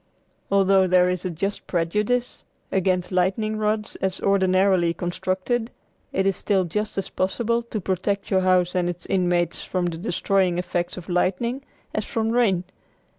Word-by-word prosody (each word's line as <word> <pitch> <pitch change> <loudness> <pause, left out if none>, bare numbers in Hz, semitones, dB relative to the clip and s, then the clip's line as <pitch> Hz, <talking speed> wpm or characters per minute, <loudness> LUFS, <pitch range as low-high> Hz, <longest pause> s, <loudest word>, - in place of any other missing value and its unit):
Although 195 -1 +4
there 180 0 +4
is 180 0 -2
a - - 0
just 195 +5 -4
prejudice 210 +8 -1 0.3
against 185 -1 +1
lightning 195 +4 +1
rods 215 0 -1
as 190 -1 -2
ordinarily 185 -3 +3
constructed, 185 +6 -2 0.4
it 190 - 0
is 195 -1 +2
still 195 -1 +1
just 210 +5 -3
as 195 - -3
possible 235 +5 0
to 230 -2 -5
protect 195 +2 -2
your 190 -1 +4
house 185 -1 +3
and 180 -1 +1
its 175 0 -6
inmates 175 -3 0
from 180 -1 -1
the 170 -2 -2
destroying 190 -2 +1
effects 175 0 -2
of 180 - -8
lightning 195 +9 0 0.3
as - - -1
from 225 -3 -1
rain. 215 -7 +2
190 Hz, 155 wpm, -24 LUFS, 180-210 Hz, 0.4 s, Although